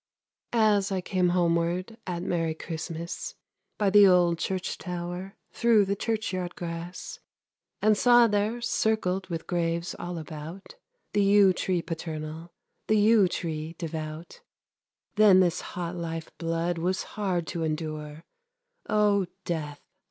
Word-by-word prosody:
As 210 -3 +3
I 190 - 0
came 180 0 +1
homeward 175 +3 +1
At 175 -1 -3
merry 165 -3 -1
Christmas, 165 +1 -5 0.4
By 205 -2 +2
the 205 0 +8
old 175 -2 +4
church 185 -1 -2
tower, 180 +2 -5 0.2
Through 230 -4 +4
the 200 +1 -1
churchyard 195 -5 -2
grass, 170 +1 -6 0.6
And 215 0 +5
saw 240 +2 +6
there, 215 +2 0
circled 220 -5 0
With 165 -2 -4
graves 170 -1 -1
all 175 0 -5
about, 160 +4 -8 0.4
The 205 - +3
yew 200 -1 +6
tree 180 -1 -1
paternal, 160 0 -6 0.4
The 215 - +3
yew 210 -1 +5
tree 160 -2 -4
devout, 160 - -6 0.8
Then 205 -3 +7
this 175 -2 +2
hot 175 0 -5
life 165 -1 -5
blood 165 +1 -1
Was 185 +3 0
hard 185 -5 -1
to 170 - -3
endure, 155 -1 -4 0.7
O 205 -3 +3 0.2
Death! 150 -4 -3
175 Hz, 130 wpm, -27 LUFS, 165-200 Hz, 0.8 s, the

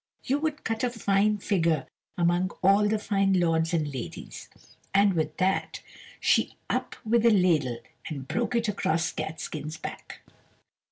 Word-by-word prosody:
you 275 +3 0
would 305 -1 -2
cut 225 +1 -2
a 250 - +2
fine 210 -2 +2
figure 165 -8 +1 0.3
among 175 +1 +2
all 200 +2 +5
the 215 +1 +1
fine 195 -2 +1
lords 165 -1 +2
and 155 -4 -1
ladies." 130 -3 -7 0.5
And 200 0 +5
with 160 -3 -1
that 190 +1 0 0.4
she - - +2 0.2
up - - -2
with 230 +1 +3
a 235 - +7
ladle 170 - +3 0.3
and 140 -4 -6
broke 240 - -1
it 235 -1 +1
across 165 -5 0
Catskin's 155 0 -5
back. - - -8
190 Hz, 150 wpm, -27 LUFS, 160-215 Hz, 0.5 s, a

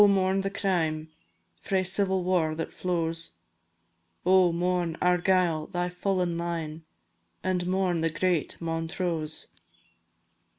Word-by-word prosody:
mourn 190 0 +2
the 195 - -1
crime, 165 -6 -1 0.5
Frae 190 -1 +1
civil 190 0 +2
war 175 -4 +1
that 165 0 -4
flows; 165 - -2 0.9
Oh! 185 -1 +5
mourn, 175 -1 0
Argyll, 180 -3 +2
thy 175 0 -2
fallen 180 -1 -1
line, 165 -2 -4 0.6
And 180 -1 0
mourn 185 -2 +1
the 165 - +2
great 165 0 0
Montrose. 165 -1 -2
175 Hz, 110 wpm, -28 LUFS, 165-185 Hz, 0.9 s, Oh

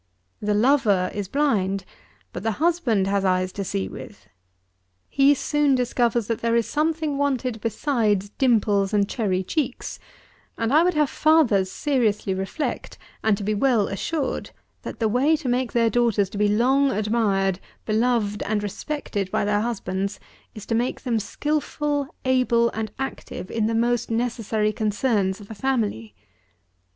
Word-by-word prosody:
The 210 0 0
lover 210 -6 +3
is 205 -2 -3
blind; 195 -8 0 0.5
but - - -5
the 225 +1 -1
husband 295 - +1
has 200 0 0
eyes 185 -1 +1
to 200 - -4
see 95 - -2
with. - - -11 0.8
He 275 +1 +4
soon 295 0 +2
discovers 240 -2 +1
that 230 +1 -3
there 230 0 +1
is 235 -1 +2
something 310 -1 -1
wanted 255 -5 -1
besides 215 -4 0
dimples 210 -5 +2
and 200 -1 +3
cherry 190 -6 -1
cheeks; 265 - -3 0.6
and 230 +3 0
I 310 - +6
would 355 0 +2
have 300 -2 +2
fathers 245 -12 +3
seriously 220 -9 0
reflect, 195 - -4 0.3
and 220 -2 +3
to 200 - -6
be 215 +2 0
well 220 -1 +2
assured, 270 +8 -3 0.3
that - - -7
the 225 - +2
way 260 +8 +3
to 300 -3 -5
make 250 0 0
their 230 -1 +2
daughters 215 -4 +2
to - - -6
be 210 - +3
long 260 +7 +3
admired, 205 -4 +1 0.3
beloved 220 -2 +1
and 210 0 -1
respected 205 -2 -4
by 205 +1 0
their 205 0 +1
husbands, 195 -4 -3 0.4
is 215 - -8
to - - -2
make 240 +3 -1
them 240 -4 0
skilful, 295 +4 -2 0.2
able 245 -2 +3
and 220 -1 -4
active 270 -7 -6
in 220 -1 0
the 225 - -1
most 240 +1 +1
necessary 225 -2 -1
concerns 210 -2 0
of 205 +1 -12
a - - -4
family. 205 - -2
225 Hz, 155 wpm, -24 LUFS, 205-265 Hz, 0.8 s, I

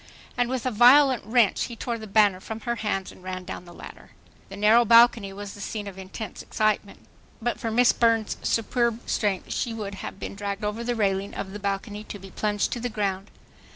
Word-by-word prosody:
And 245 -1 +1
with 260 -1 -3
a 255 - +1
violent 255 +2 +6
wrench 225 -2 +3
he 235 - -8
tore 230 0 -4
the 220 - -8
banner 200 -2 +4
from 220 +3 -7
her 235 -1 -2
hands 195 -4 -2
and - - -16
ran 185 0 -5
down 180 -1 -7
the 175 - -13
ladder. - - -12 0.4
The 195 - -9
narrow 215 +4 +5
balcony 230 -3 +5
was 200 +1 -8
the 205 - -11
scene 210 +1 -4
of 200 -2 -8
intense 190 +2 -7
excitement. 215 -1 -1 0.4
But 240 +1 -2
for 225 - -2
Miss 240 +2 +4
Burns' 230 -2 +2
superb 235 0 0
strength 200 -3 -1
she 230 -3 -2
would 205 -3 -5
have - - -7
been - - -5
dragged 200 0 -4
over 210 +3 -2
the 240 0 -1
railing 200 -2 -1
of 190 - -5
the 205 - -7
balcony 200 +1 -3
to - - -7
be 195 -1 -12
plunged 205 0 -1
to 240 - -3
the 245 +1 -3
ground. 200 -3 -2
215 Hz, 215 wpm, -25 LUFS, 200-235 Hz, 0.4 s, violent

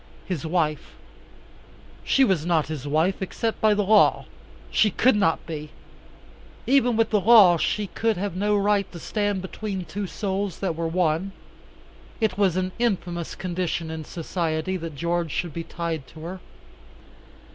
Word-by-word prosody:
His 170 -4 -3
wife 155 -3 -1 1.1
she 270 - +3
was 190 - +2
not 160 -4 +1
his 145 -3 -5
wife, 160 +7 +1
except 225 +4 -3
by 215 -1 +4
the 205 - +1
law. 210 +2 +4 0.5
She 215 - +4
could 245 +5 +3
not 195 -6 +1
be. 155 -2 -6 1.0
Even 250 -3 +3
with 225 -1 +2
the 210 -2 +3
law 195 -5 +7
she 210 +5 0
could 225 +1 -1
have 200 -1 -3
no 205 +2 +1
right 200 -1 +1
to 170 - -8
stand 205 0 -1
between 190 -1 -5
two 205 +2 -4
souls 195 -2 -3
that 185 -4 -2
were 165 0 -2
one. 175 +2 0 0.9
It 220 -2 +1
was 190 -3 +2
an 185 0 -1
infamous 175 -7 -1
condition 175 -3 -3
in 160 -1 -5
society 165 +2 -2
that 165 -4 -6
George 170 +2 -1
should 170 +1 -3
be 165 - -4
tied 165 -5 -4
to 155 - -13
her. 180 +3 -6
185 Hz, 155 wpm, -24 LUFS, 165-205 Hz, 1.1 s, law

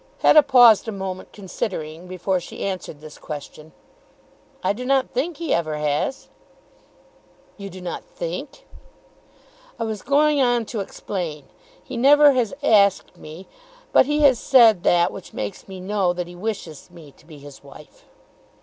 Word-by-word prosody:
Hetta 305 - +7
paused 245 -6 +5
a - - -3
moment, 190 -2 -6
considering, 180 -4 -6
before 185 +1 -2
she 175 - -9
answered 185 -6 -6
this 155 -1 -12
question. 150 +1 -9 0.9
"I - - +1
do 245 +5 -7
not 265 0 +1
think 285 +6 -3
he 330 -2 -2
ever 155 -2 -1
has." 150 - -2 1.3
"You 200 -1 -9
do 185 0 -11
not 180 -1 -6
think?" - - -7 1.1
"I - - -1
was 220 -3 -4
going 295 0 +2
on 245 -2 +1
to 220 - -2
explain. 175 -6 -5 0.4
He 255 - -8
never 290 +4 +6
has 245 -5 0
asked 200 -7 +3
me. 160 +5 -12 0.5
But - - +5
he 295 +1 0
has 265 -5 +5
said 230 -8 +5
that 175 -1 +2
which 195 - -11
makes 105 -1 -6
me 190 -1 -9
know 190 -1 -1
that 180 0 -4
he 175 - -12
wishes 185 -6 -6
me 165 -5 -15
to 155 - -25
be 155 -3 -13
his 145 -1 -14
wife." 140 +2 -16
195 Hz, 160 wpm, -22 LUFS, 170-250 Hz, 1.3 s, Hetta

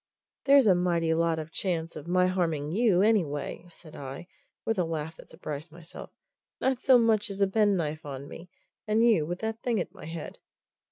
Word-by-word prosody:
"There's 275 -2 +6
a 200 - +6
mighty 170 -2 +1
lot 165 0 +1
of 160 +1 -6
chance 170 -3 -2
of 150 - -8
my 180 +1 +3
harming 165 -5 -1
you, 200 -2 +3
anyway!" 170 -7 0
said 165 -2 -15
I, 135 +4 -7 0.4
with 225 -3 0
a - - +3
laugh 160 -1 -4
that - - -14
surprised 150 +2 -7
myself. 165 0 -11 0.5
"Not 260 -1 0
so 260 -2 +6
much 225 -2 +2
as 195 0 -5
a 200 - +5
penknife 190 -7 +1
on 140 -1 -7
me, 170 +4 -11 0.4
and 215 +2 +3
you 180 -10 +3
with 175 +2 -4
that 220 +1 -3
thing 235 -4 0
at - - -4
my - - -11
head." 165 -1 -7
175 Hz, 190 wpm, -28 LUFS, 160-210 Hz, 0.5 s, There's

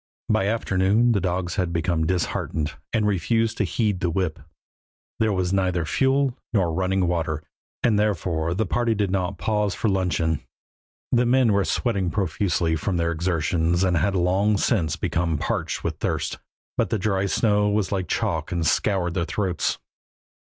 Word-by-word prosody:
By 95 - +2
afternoon 105 +1 +2
the 100 -4 +1
dogs 90 0 -2
had 90 -3 0
become 85 -1 0
disheartened 85 -2 -1 0.2
and 110 -2 +1
refused 110 +3 +1
to - - +3
heed 105 -5 0
the 90 - 0
whip. 85 -3 -1 0.8
There 110 -1 +2
was 95 -1 0
neither 90 -3 +1
fuel 135 - +2 0.2
nor 90 -6 +2
running 95 +1 +1
water, 80 -3 -1 0.4
and 110 -3 +3
therefore 85 -5 0
the 110 +3 0
party 115 +3 +1
did 100 -2 0
not 95 0 -1
pause 105 -1 0
for 110 - 0
luncheon. 85 -5 0 0.7
The 125 -1 +3
men 125 -3 +4
were 100 0 +3
sweating 100 -7 0
profusely 85 -2 0
from 90 +3 -1
their 85 0 +1
exertions 85 +1 0
and 90 -1 +2
had 95 +5 +1
long 95 +4 +2
since 85 -8 +1
become 85 0 -1
parched - - -2
with - - -3
thirst, - - -2 0.4
but - - +1
the - - +1
dry 95 -1 0
snow 105 0 +2
was 105 -2 0
like 95 -3 -1
chalk 80 +2 -1
and 85 -2 -1
scoured 90 0 +1
their 85 -2 -1
throats. 95 -5 -1
95 Hz, 165 wpm, -24 LUFS, 85-105 Hz, 0.8 s, men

